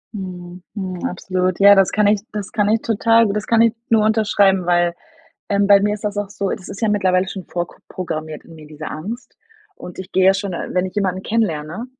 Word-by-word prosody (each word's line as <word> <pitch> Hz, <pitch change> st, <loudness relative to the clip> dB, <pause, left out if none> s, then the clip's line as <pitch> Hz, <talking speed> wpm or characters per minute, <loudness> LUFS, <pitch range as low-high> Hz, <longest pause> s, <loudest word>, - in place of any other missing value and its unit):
Mhm, 180 Hz, -2 st, -8 dB
mhm, 185 Hz, -3 st, -5 dB
absolut, 185 Hz, 0 st, -2 dB
ja, 200 Hz, 0 st, +8 dB
das 195 Hz, -2 st, +4 dB
kann 210 Hz, -1 st, +2 dB
ich 205 Hz, 0 st, +3 dB
das 205 Hz, -2 st, -5 dB
kann 210 Hz, -4 st, +1 dB
ich 225 Hz, +1 st, +2 dB
total 230 Hz, +1 st, +3 dB
das 210 Hz, 0 st, -3 dB
kann 230 Hz, -1 st, +4 dB
ich 230 Hz, -1 st, +3 dB, 0.2 s
nur 220 Hz, -2 st, +4 dB
unterschreiben, 205 Hz, -4 st, +2 dB
weil, 175 Hz, -1 st, +2 dB, 0.6 s
ähm, 200 Hz, 0 st, +2 dB
bei 200 Hz, -1 st, +7 dB
mir 210 Hz, +1 st, +1 dB
ist 210 Hz, -, -7 dB
das 205 Hz, -1 st, -3 dB
auch 205 Hz, -1 st, -2 dB
so 200 Hz, -1 st, -3 dB
das 185 Hz, -, -5 dB
ist 200 Hz, -, -8 dB
ja 220 Hz, -, +2 dB
mittlerweile 190 Hz, -2 st, +1 dB
schon 190 Hz, -, -7 dB
vorprogrammiert 160 Hz, -2 st, -6 dB
in 165 Hz, -, -15 dB
mir 155 Hz, -1 st, -13 dB
diese 150 Hz, 0 st, -9 dB
Angst 220 Hz, +11 st, -7 dB, 0.4 s
und 180 Hz, -, -10 dB
ich 190 Hz, +1 st, -8 dB
gehe 190 Hz, 0 st, +3 dB
ja 190 Hz, -, +6 dB
schon, 195 Hz, -1 st, -4 dB
äh -, -, -4 dB
wenn 180 Hz, +1 st, +1 dB
ich 185 Hz, -, -12 dB
jemanden 190 Hz, -2 st, -1 dB
kennenlerne, 190 Hz, -3 st, -2 dB
195 Hz, 220 wpm, -19 LUFS, 180-210 Hz, 0.6 s, ja